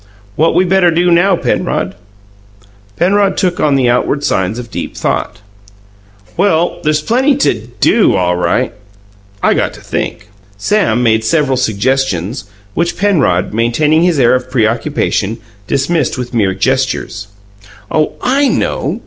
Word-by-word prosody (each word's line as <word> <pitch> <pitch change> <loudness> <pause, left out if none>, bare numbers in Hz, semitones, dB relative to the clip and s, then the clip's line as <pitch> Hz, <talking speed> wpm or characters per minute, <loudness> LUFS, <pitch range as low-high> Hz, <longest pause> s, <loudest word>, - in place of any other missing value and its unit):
"What 160 +2 +2
we 180 +2 +3
better 185 -1 +3
do 175 +2 +2
now, 180 +3 +4
Penrod?" - - -1 1.0
Penrod 195 - +2
took 180 -2 0
on 145 -2 +2
the 130 -2 +2
outward 125 +4 0
signs 95 0 0
of 120 -3 -8
deep - - -6
thought. 105 0 -2 0.9
"Well, 175 -2 +1
there's 155 0 0
plenty 260 - +2
to 115 - 0
DO, - - +3
all 90 -1 +1
right. 90 - 0 0.7
I - - +4
got - - -1
to - - -13
think." 105 - -4 0.3
Sam 125 - +1
made 110 -1 +2
several 145 +1 +1
suggestions, 125 -3 -1 0.3
which 170 +6 -1
Penrod 150 - +1
maintaining 135 +8 +2
his 175 -2 +2
air 120 -2 +4
of 125 0 -1
preoccupation 115 -2 0 0.3
dismissed 145 +5 0
with 125 0 -5
mere 100 -5 +1
gestures. 130 -2 -1 0.6
"Oh, 155 -1 +1
I 275 +3 +2
know!" - - -1
135 Hz, 140 wpm, -14 LUFS, 115-175 Hz, 1.0 s, now